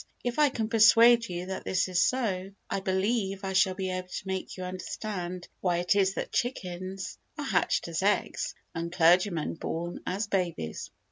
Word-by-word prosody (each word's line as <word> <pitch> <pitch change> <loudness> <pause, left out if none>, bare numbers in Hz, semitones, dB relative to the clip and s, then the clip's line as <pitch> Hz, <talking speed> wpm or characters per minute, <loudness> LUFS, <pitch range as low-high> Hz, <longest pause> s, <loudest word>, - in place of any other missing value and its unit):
If 245 +3 -2
I 295 -1 +6
can 225 -4 -2
persuade 230 +1 +6
you 175 0 -4
that 190 0 -5
this 185 0 +1
is 180 -1 +1
so, 195 -8 0 0.2
I - - 0
believe 195 +1 0
I 190 0 -2
shall 190 0 +3
be 190 -1 -2
able 185 0 -4
to 185 - -6
make 190 0 -4
you 185 - -5
understand 185 -1 -5
why 175 -2 +1
it 175 +3 +2
is 195 -1 +2
that - - -4
chickens 190 -5 -3 0.2
are - - -3
hatched - - +1
as - - -2
eggs - - 0 0.2
and 170 0 -4
clergymen 175 -1 +3
born 170 +1 -4
as 195 +4 -1
babies. 175 - -2
190 Hz, 180 wpm, -28 LUFS, 180-205 Hz, 0.2 s, I